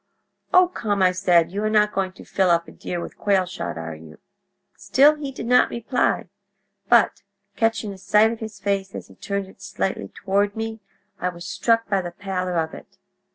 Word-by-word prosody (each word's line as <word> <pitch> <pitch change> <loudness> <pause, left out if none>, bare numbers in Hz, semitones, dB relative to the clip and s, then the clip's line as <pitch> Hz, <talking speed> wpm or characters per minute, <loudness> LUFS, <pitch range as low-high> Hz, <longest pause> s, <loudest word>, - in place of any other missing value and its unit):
"'O, 365 0 +6
come!' 205 - -1
I 185 - +5
said. 175 -3 +3
'You 200 +2 -3
are 215 - +1
not 210 -1 +3
going 190 -1 -1
to - - -14
fill 190 -2 +1
up 170 -1 +2
a - - -11
deer 175 - -5
with - - -8
quail 195 -2 +2
shot, 180 - -5
are 80 0 -5
you?' 80 0 -13 0.6
"Still 285 +3 +4
he 295 -2 -6
did 260 - -7
not 250 +1 +4
reply; 235 -2 0 0.6
but, 235 -2 +4 0.3
catching 225 -2 0
a 190 - -13
sight 210 +3 +4
of 230 - -6
his 220 -2 -7
face 195 -1 -2
as - - -8
he - - -16
turned 200 -1 -3
it 190 - -17
slightly 195 -1 -3
toward 200 +1 -1
me, 225 0 -4 0.4
I 180 - 0
was 175 -1 -9
struck 225 +5 +1
by 195 -2 +1
the 175 - -5
pallor 185 -1 -3
of 160 -1 -1
it. - - -13
200 Hz, 200 wpm, -23 LUFS, 185-220 Hz, 0.6 s, O